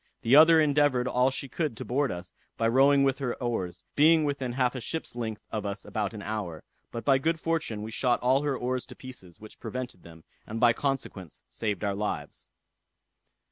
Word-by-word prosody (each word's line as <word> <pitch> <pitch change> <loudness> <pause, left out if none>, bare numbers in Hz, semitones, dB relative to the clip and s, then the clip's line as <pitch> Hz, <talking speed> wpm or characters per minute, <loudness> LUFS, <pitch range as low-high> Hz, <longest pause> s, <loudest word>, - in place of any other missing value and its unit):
The 120 +4 +5
other 160 +2 +8
endeavored 145 -4 +3
all 125 +1 +3
she 135 +1 -4
could 150 -4 -3
to - - -6
board 140 +2 0
us, 90 0 -7 0.2
by 115 - +2
rowing 140 +4 +5
with 135 0 +1
her 125 -3 -2
oars, 90 -8 -3
being 160 +2 +5
within 140 -4 -2
half 125 -1 +1
a 130 - -5
ship's 160 0 -4
length 110 -3 -4
of 110 -2 -2
us 100 0 -5
above 105 0 -3
an 105 - -7
hour; 100 -8 -4 0.3
but 115 -2 -6
by 135 -1 +4
good 160 +3 0
fortune 160 -11 -2
we 110 - -6
shot 120 +1 +1
all 130 +2 +3
her 145 -3 -1
oars 125 0 -2
to 125 - -11
pieces, 120 -10 -11
which 110 0 -13
prevented 125 -7 -6
them, 80 -1 -14 0.2
and 110 +1 -4
by 120 -1 +5
consequence 125 - -4
saved 105 -5 -2
our 100 -1 0
lives. 100 -8 -4
125 Hz, 200 wpm, -28 LUFS, 105-140 Hz, 0.3 s, other